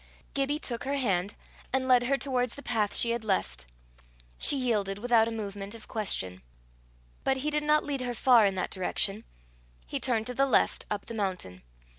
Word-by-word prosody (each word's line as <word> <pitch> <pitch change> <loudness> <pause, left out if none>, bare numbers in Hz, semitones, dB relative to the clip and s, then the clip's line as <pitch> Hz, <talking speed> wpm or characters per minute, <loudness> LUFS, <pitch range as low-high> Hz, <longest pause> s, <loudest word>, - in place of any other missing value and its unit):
Gibbie 280 +1 0
took 240 -6 -3
her 280 +1 -1
hand, 200 -6 0 0.4
and 260 0 0
led 250 -1 +5
her 275 +2 +2
towards 250 -2 -1
the 285 - -10
path 215 -4 0
she 235 - +3
had 235 -1 -2
left; 190 - -1 0.7
she 285 - +3
yielded 210 -6 0
without 230 0 +3
a - - -3
movement 205 -1 -5
of 225 - -12
question. 95 - -1 0.8
But 265 0 +1
he 295 +3 -2
did 300 0 +1
not 300 0 +3
lead 280 -3 -2
her 245 -1 -3
far 235 -3 +5
in 195 - -1
that 185 - -2
direction; 195 +3 0 0.6
he - - -4
turned 225 -3 +1
to 250 - -3
the 275 +2 +2
left 260 - +2
up 205 -1 -3
the - - -7
mountain. 185 - -3
230 Hz, 190 wpm, -29 LUFS, 200-260 Hz, 0.8 s, led